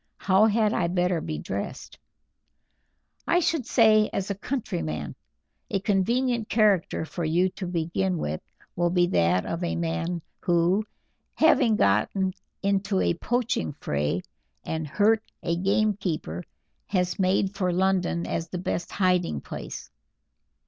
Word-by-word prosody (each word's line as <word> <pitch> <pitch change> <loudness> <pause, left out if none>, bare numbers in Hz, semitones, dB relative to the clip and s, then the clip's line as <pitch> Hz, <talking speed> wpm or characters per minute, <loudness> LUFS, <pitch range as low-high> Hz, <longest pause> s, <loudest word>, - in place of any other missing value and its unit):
How 195 +3 +4
had 220 0 +2
I 170 - +1
better 180 -1 +1
be 155 - -4
dressed?" - - -6 1.3
"I 350 - +4
should 320 -7 0
say 215 -3 +5
as 195 +1 -2
a - - +1
countryman. 80 - -3 0.6
A 195 - 0
convenient 230 +4 +1
character 205 -7 +2
for 170 +2 -5
you 170 +4 +2
to 185 0 -6
begin 175 +2 -1
with 75 - -3 0.3
will 175 0 +1
be 175 0 +3
that 85 - +2
of 170 +2 -3
a 170 - -1
man 170 0 -2 0.2
who, 175 +4 +2 0.5
having 255 -8 +4
got 105 - +3 0.5
into 200 0 +1
a - - +2
poaching 230 - -1
fray, 75 +5 -2 0.4
and 160 -1 -3
hurt 215 +8 +3 0.2
a 170 -1 0
gamekeeper, 185 - -1 0.4
has 180 -2 0
made 190 +1 +2
for 185 -2 0
London 180 -1 +1
as 165 0 -2
the 180 - -5
best 175 -1 -3
hiding 180 - +1
place. - - -8
185 Hz, 135 wpm, -26 LUFS, 165-205 Hz, 1.3 s, say